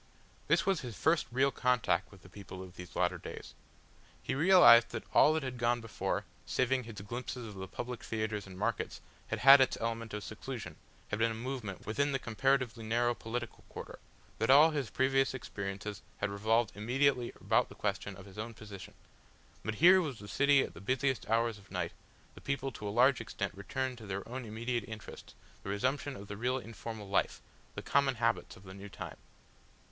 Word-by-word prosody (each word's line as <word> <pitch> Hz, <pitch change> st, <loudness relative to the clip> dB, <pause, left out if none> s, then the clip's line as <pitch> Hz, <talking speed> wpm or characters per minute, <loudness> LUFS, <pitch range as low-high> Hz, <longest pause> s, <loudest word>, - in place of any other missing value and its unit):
This -, -, +3 dB
was 190 Hz, -5 st, +1 dB
his 120 Hz, -5 st, -7 dB
first 160 Hz, +1 st, +2 dB
real 135 Hz, +3 st, +3 dB
contact 115 Hz, -9 st, +1 dB
with 95 Hz, -3 st, -16 dB
the -, -, -13 dB
people 95 Hz, -1 st, -9 dB
of 90 Hz, -1 st, -12 dB
these 90 Hz, -1 st, -10 dB
latter -, -, +1 dB
days. -, -, -9 dB, 0.7 s
He -, -, -2 dB
realised 140 Hz, -7 st, +8 dB
that 110 Hz, -, -5 dB
all -, -, +7 dB
that 160 Hz, -, -1 dB
had 130 Hz, -2 st, -5 dB
gone 120 Hz, +1 st, +2 dB
before, 115 Hz, -2 st, -3 dB, 0.2 s
saving 130 Hz, 0 st, +1 dB
his 110 Hz, -3 st, -8 dB
glimpses 120 Hz, +3 st, -5 dB
of 105 Hz, -, -8 dB
the 95 Hz, -1 st, -6 dB
public 120 Hz, +4 st, -6 dB
theatres 110 Hz, -2 st, -3 dB
and 95 Hz, -1 st, -10 dB
markets, -, -, -2 dB, 0.3 s
had -, -, -3 dB
had 135 Hz, +1 st, +10 dB
its 130 Hz, -, +2 dB
element 115 Hz, -1 st, -3 dB
of 105 Hz, -, -5 dB
seclusion, 110 Hz, -6 st, -6 dB, 0.3 s
had 105 Hz, -, -2 dB
been 115 Hz, +1 st, +3 dB
a 110 Hz, -, -3 dB
movement 120 Hz, -4 st, -5 dB
within 140 Hz, +7 st, 0 dB
the -, -, +2 dB
comparatively 130 Hz, -1 st, 0 dB
narrow 120 Hz, +2 st, +2 dB
political 120 Hz, 0 st, -5 dB
quarter, -, -, -8 dB, 0.4 s
that -, -, 0 dB
all 150 Hz, +4 st, +8 dB
his 145 Hz, -6 st, -2 dB
previous 135 Hz, 0 st, +2 dB
experiences 100 Hz, -4 st, -5 dB, 0.2 s
had 100 Hz, 0 st, -1 dB
revolved 110 Hz, +2 st, +2 dB
immediately 125 Hz, +4 st, +1 dB
about -, -, +2 dB
the -, -, -12 dB
question -, -, -2 dB
of 95 Hz, -, -11 dB
his 100 Hz, +1 st, -12 dB
own 115 Hz, +1 st, -5 dB
position. 100 Hz, -4 st, -10 dB, 0.7 s
But 110 Hz, -, -2 dB
here 185 Hz, -, +7 dB
was 145 Hz, -8 st, -4 dB
the 105 Hz, -, -10 dB
city 140 Hz, +3 st, +4 dB
at -, -, -7 dB
the -, -, -11 dB
busiest 130 Hz, +4 st, 0 dB
hours 115 Hz, -1 st, +1 dB
of 95 Hz, -, -19 dB
night, 90 Hz, -3 st, -2 dB, 0.4 s
the -, -, -13 dB
people 140 Hz, -1 st, -2 dB
to 105 Hz, -3 st, -7 dB
a -, -, -1 dB
large 125 Hz, +4 st, +4 dB
extent 100 Hz, -3 st, -4 dB
returned 130 Hz, +5 st, -3 dB
to 110 Hz, -, -10 dB
their 100 Hz, 0 st, -4 dB
own 125 Hz, +1 st, -5 dB
immediate 115 Hz, +2 st, -2 dB
interests, 110 Hz, -1 st, -9 dB, 0.3 s
the -, -, -7 dB
resumption 130 Hz, +7 st, -1 dB
of 100 Hz, -2 st, -9 dB
the 100 Hz, -, -6 dB
real 125 Hz, +4 st, 0 dB
informal 115 Hz, -3 st, -7 dB
life, 100 Hz, -, +1 dB, 0.4 s
the -, -, -5 dB
common 140 Hz, -2 st, +2 dB
habits 115 Hz, 0 st, 0 dB
of 95 Hz, -, -16 dB
the 95 Hz, -1 st, -10 dB
new 100 Hz, +1 st, -9 dB
time. -, -, -8 dB
115 Hz, 195 wpm, -32 LUFS, 105-130 Hz, 0.7 s, had